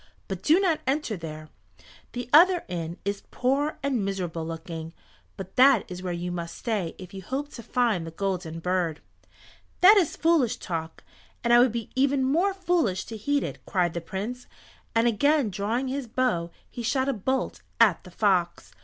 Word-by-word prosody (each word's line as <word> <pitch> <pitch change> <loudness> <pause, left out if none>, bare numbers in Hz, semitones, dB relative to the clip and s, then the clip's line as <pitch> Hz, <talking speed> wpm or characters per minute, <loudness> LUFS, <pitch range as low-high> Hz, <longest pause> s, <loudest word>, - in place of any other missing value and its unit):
But 190 -2 -5
do 320 +5 +4
not 355 -5 +1
enter 270 -4 0
there. 155 -3 -8 0.6
The 245 -1 -4
other 350 +3 +7
inn 170 -1 -4
is 200 0 -2
poor 275 +4 0
and 265 -6 0
miserable 180 -4 -3
looking, 165 0 -6 0.4
but 190 -1 -9
that 260 -4 +6
is 180 0 -6
where 185 -1 -3
you 175 +1 -3
must 170 -1 -5
stay 210 -9 -2
if 185 -1 -11
you 190 - -7
hope 270 +9 -4
to 240 - -9
find 225 -8 0
the - - -4
Golden 180 -2 -3
Bird." 175 -2 -1 0.8
"That 395 +4 +9
is 355 -7 +2
foolish 320 -8 +2
talk, 160 -2 -5 0.4
and 235 0 +3
I 240 - +8
would 245 -1 +5
be 230 -2 -5
even 270 0 +2
more 340 +9 +2
foolish 345 - 0
to 225 - -7
heed 285 +7 0
it," - - -6
cried 175 -3 +1
the 170 - -3
Prince, 220 +9 -5 0.5
and 230 +1 +4
again 280 +1 +2
drawing 220 +7 -1
his 265 -1 -3
bow 225 -9 0 0.2
he 245 - -7
shot 260 +3 0
a 275 - +1
bolt 260 +4 -2 0.2
at 215 -7 +4
the - - -12
fox. 180 -2 0
220 Hz, 180 wpm, -26 LUFS, 180-270 Hz, 0.8 s, That